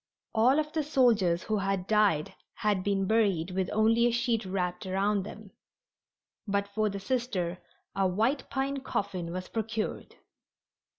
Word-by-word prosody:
All 245 +5 +4
of 305 0 -1
the 320 - +1
soldiers 230 - +3
who 215 -1 -1
had 195 -2 -1
died 205 -8 +2 0.2
had 205 -3 0
been 195 -1 +1
buried 195 -5 +2
with 185 0 -1
only 225 +2 +4
a - - +2
sheet 235 -1 0
wrapped 180 -1 -2
around 195 +2 +1
them, 215 -2 -10 1.0
but 200 0 0
for 215 +1 0
the 200 0 -5
Sister 195 -6 -2 0.4
a 195 -1 +2
white 225 +9 0
pine 275 +1 -1
coffin 195 -9 -3
was 185 +1 -5
procured. 220 -1 -3
205 Hz, 145 wpm, -29 LUFS, 190-230 Hz, 1.0 s, All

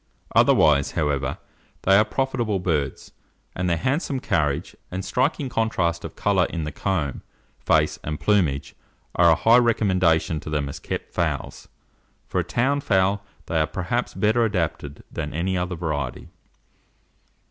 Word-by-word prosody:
Otherwise, 70 -3 +4
however, 70 -4 -1 0.5
they 95 - +5
are 105 - +6
profitable 120 -4 -1
birds, 75 -7 -2 0.4
and 90 0 -1
their 85 - +1
handsome 135 - -1
carriage, 75 - -1
and 95 +1 -4
striking 130 +7 0
contrast 95 -8 0
of - - -7
colour 95 -4 +2
in 85 -1 -4
the 75 - -4
comb, 80 -10 -2 0.4
face, - - +2
and 75 0 -4
plumage, 85 -10 +1 0.4
are 85 -1 +5
a 80 - +6
high 115 +7 +5
recommendation 95 -9 +2
to 75 - -8
them 75 -2 -1
as - - -7
kept - - -5
fowls. - - -2 0.6
For - - -2
a - - +1
town 140 +4 0
fowl, 100 -2 +1 0.2
they 80 - 0
are 80 - +2
perhaps 95 +9 -2
better 110 +2 +2
adapted 85 -8 -2
than 75 0 -5
any 95 +3 0
other 90 0 -2
variety. 80 -4 -4
90 Hz, 145 wpm, -24 LUFS, 80-110 Hz, 0.6 s, are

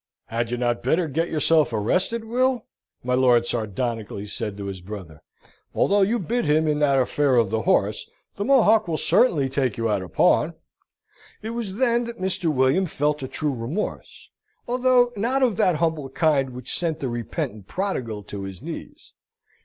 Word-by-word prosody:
"Had 115 0 -2
you 120 - -2
not 120 -1 0
better 160 +7 +1
get 165 +4 -1
yourself 155 -1 +2
arrested, 180 - 0
Will?" 250 +1 0 0.4
my 125 +1 -1
lord 125 -2 +4
sardonically 110 -2 -3
said 105 -1 -5
to 100 - -6
his 95 -2 -6
brother. 90 -5 -9 0.5
"Although 205 +1 +3
you 215 +5 +2
bit 235 +4 -1
him 155 +2 +2
in 150 -1 +1
that 140 -2 +3
affair 135 +1 +2
of 115 -4 +2
the 110 0 0
horse, - - +1 0.3
the 200 - -3
Mohock 225 -5 +4
will 160 -2 -1
certainly 165 - +3
take 130 -4 -1
you 115 0 0
out 100 -2 0
of 90 -3 -10
pawn." - - +3 0.9
It 220 - -4
was 230 -5 -4
then 240 0 +2
that 235 0 -7
Mr. 185 -3 0
William 135 +7 +2
felt 150 -1 -1
a 130 - -4
true 150 +2 -2
remorse, 130 - -5 0.4
although 245 0 +3
not 250 +6 0
of 240 -6 +2
that 180 - +3
humble 160 -4 -1
kind 140 -2 +1
which 125 -1 -4
sent 165 -2 -1
the 135 - -2
repentant 110 -4 -4
Prodigal 125 - -3
to 100 0 -7
his 95 -2 -7
knees. - - -9
145 Hz, 175 wpm, -23 LUFS, -, 0.9 s, lord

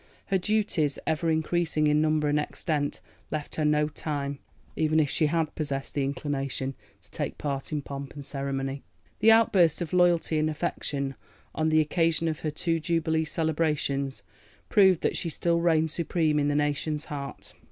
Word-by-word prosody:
Her 195 -2 +2
duties, 185 -7 +1
ever 160 +1 0
increasing 160 -1 +1
in 150 0 +3
number 155 -1 +2
and 145 0 +2
extent, 150 -1 -2 0.3
left 155 -2 -4
her 155 - -1
no 150 0 +3
time, 145 -2 -4 0.4
even 155 0 +2
if 145 -3 +1
she 155 - +2
had 160 0 0
possessed 140 -3 -3
the 140 - 0
inclination, 135 -1 -2 0.3
to - - -14
take - - -4
part 140 -1 -3
in 150 -2 -2
pomp 140 0 -7
and 145 -1 -7
ceremony. 135 0 -3 0.4
The 225 - +6
outburst 210 -8 +4
of 175 0 -4
loyalty 175 -3 +3
and 155 0 +1
affection 140 -2 -2 0.4
on 155 0 +1
the 155 0 +4
occasion 165 +1 +1
of 155 -1 -2
her 155 - -2
two 165 +2 -1
Jubilee 160 0 0
celebrations 150 -7 -1 0.5
proved 190 -5 +5
that - - 0
she 170 - -1
still 170 +1 +1
reigned 160 -2 +3
supreme 160 -1 +1
in 145 - +1
the 145 - +1
nation's 150 +1 0
heart. 140 -2 -7
155 Hz, 170 wpm, -27 LUFS, 145-165 Hz, 0.5 s, The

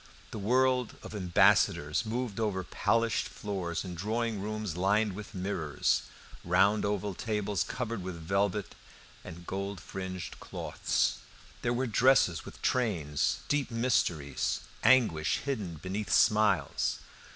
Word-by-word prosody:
The 110 - -5
world 125 +3 +2
of - - -8
ambassadors 95 -2 +3
moved 115 -2 -3
over 100 -4 0
polished 115 +5 +1
floors 95 -4 -4
in 90 - -5
drawing 110 +4 -2
rooms 105 -4 -3
lined 100 +3 +2
with 105 +1 -9
mirrors, 90 -6 0 0.4
round 95 +5 +3
oval 100 -1 -1
tables 105 -1 -1
covered 115 -4 -4
with 90 -1 -5
velvet 95 +4 -1 0.5
and 85 +1 -10
gold 100 +1 -4
fringed 95 -2 -6
cloths. - - -1 0.4
There 120 - 0
were 125 +2 0
dresses 115 -8 +3
with - - -12
trains, 85 - 0
deep 145 -3 0
mysteries, 85 - 0 0.2
anguish 110 -11 +4
hidden 105 -12 -3
beneath 95 +5 -4
smiles. 105 -9 +3
100 Hz, 120 wpm, -30 LUFS, 90-110 Hz, 0.5 s, anguish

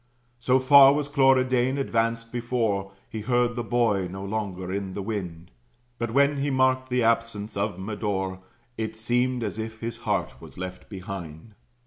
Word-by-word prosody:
So 125 +2 +3
far 135 +1 +8
was 145 0 -1
Cloridane 130 -2 +3
advanced 115 -3 -1
before, 115 -5 -1 0.2
He 110 - -6
heard 120 +1 +1
the 120 - -2
boy 115 -6 +1
no 95 +2 -6
longer 95 -3 -4
in 95 -1 -4
the 100 - -3
wind; 90 -6 -5 0.5
But 120 - -1
when 140 +4 +3
he 140 +1 0
marked 130 -1 +2
the 125 -1 +1
absence 115 -2 0
of 100 -3 -1
Medore, 95 -2 -3 0.4
It 110 0 -3
seemed 120 +2 0
as 105 0 -4
if 110 0 -5
his 115 0 -4
heart - - -2
was - - -13
left 90 0 -7
behind. 95 -1 -8
115 Hz, 160 wpm, -26 LUFS, 100-125 Hz, 0.5 s, far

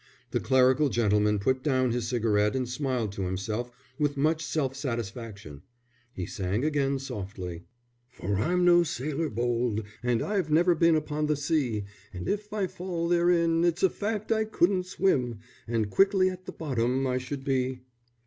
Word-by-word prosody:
The - - +1
clerical 130 +2 +4
gentleman 105 -3 +2
put 130 +6 0
down 130 -3 +1
his 120 -1 -1
cigarette 110 -3 +1
and 130 -1 -1
smiled 125 -4 -2
to 100 - -6
himself 105 +6 -3 0.3
with 145 -1 0
much 155 +3 +1
self 135 -2 -1
satisfaction. 115 - -5 0.5
He 90 -6 -5
sang 100 +9 -2
again 140 -3 +1
softly: 95 -8 -6 0.4
"For 100 -5 -3
I'm 175 - +1
no 175 0 +7
sailor 155 0 -2
bold, 120 -1 0 0.2
And 120 -2 +1
I've 195 -6 -1
never 170 +4 +4
been 165 0 +4
upon 150 0 -1
the 150 - +2
sea; 140 -8 0 0.3
And 90 - -5
if 210 0 -2
I 210 -2 0
fall 175 -2 -3
therein, 170 -1 +3
its 175 +1 +1
a 190 - +5
fact 215 +1 -3
I 220 -1 +3
couldn't 185 -3 +1
swim, 130 - +1 0.3
_And 110 -3 -1
quickly 195 -1 +4
at 185 0 -10
the - - -4
bottom 130 -3 -1
I 130 -1 0
should 135 +1 -6
be. 130 -1 -1
135 Hz, 165 wpm, -28 LUFS, 115-165 Hz, 0.5 s, no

